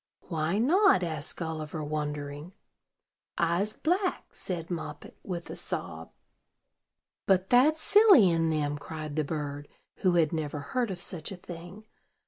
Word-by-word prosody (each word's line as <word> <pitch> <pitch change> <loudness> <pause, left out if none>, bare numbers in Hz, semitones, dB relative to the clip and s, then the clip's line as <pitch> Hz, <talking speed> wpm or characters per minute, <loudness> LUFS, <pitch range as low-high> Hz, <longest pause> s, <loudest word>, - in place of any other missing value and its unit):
"Why 160 +2 0
not?" 320 - +4
asked 155 -3 -3
Gulliver, 155 -2 -4
wondering. 150 +2 -4 0.8
"I'se 175 +5 +1
black," 360 - 0
said 175 -2 -5
Moppet, 155 -3 -6
with 175 -3 -6
a - - -6
sob. - - -5 1.2
"But 190 -1 +2
that's 285 +6 +5
silly 410 - +7
in 165 -1 +2
them," 145 -2 -1
cried 155 -1 -6
the 155 - +1
bird, 145 -1 -4 0.3
who 185 -2 +2
had 165 -1 +3
never 150 -2 -2
heard 235 - -2
of 185 -2 -5
such 175 -1 -4
a 190 - -6
thing. 175 +4 -10
165 Hz, 135 wpm, -29 LUFS, 155-195 Hz, 1.2 s, silly